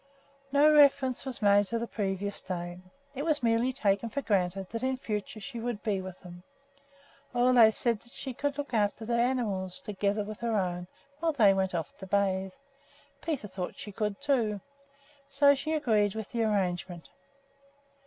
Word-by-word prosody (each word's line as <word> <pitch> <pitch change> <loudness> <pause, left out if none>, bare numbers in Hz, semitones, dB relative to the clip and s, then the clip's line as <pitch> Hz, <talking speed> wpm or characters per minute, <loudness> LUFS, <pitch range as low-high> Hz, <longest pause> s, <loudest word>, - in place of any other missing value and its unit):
No 295 +2 +5
reference 280 -3 +4
was 250 -4 -5
made 205 0 +5
to 230 - -1
the 230 - -2
previous 200 -2 -3
day; 175 -1 -5 0.3
it 275 - -4
was 305 -4 +1
merely 230 +2 +2
taken 215 -3 0
for 275 +5 -3
granted 190 -2 0
that 230 - -3
in 260 0 0
future 215 -3 -4
she 240 +2 -7
would 235 -2 -4
be 200 -4 0
with 185 -1 -8
them. 175 -1 -11 0.9
Ole 245 -2 +6
said 230 0 0
that 240 +2 -16
she 265 -1 -6
could 285 +3 -2
look 285 -3 -5
after 210 0 0
their 235 +1 0
animals, 205 -8 -1
together 205 0 -1
with 210 0 -8
her 230 -1 0
own, 180 -2 -2 0.3
while 325 0 +1
they 215 -8 +5
went 190 -1 0
off 165 -3 -4
to 190 - -8
bathe. 190 -1 0 0.7
Peter 300 -10 -3
thought 185 -2 -6
she 205 - -8
could, 210 0 -2
too. 225 -7 +1 0.7
So 280 0 +5
she 295 +3 -3
agreed 215 -9 +2
to 220 - -3
the 230 +3 -4
arrangement. 180 -4 -2
215 Hz, 175 wpm, -29 LUFS, 195-255 Hz, 0.9 s, Ole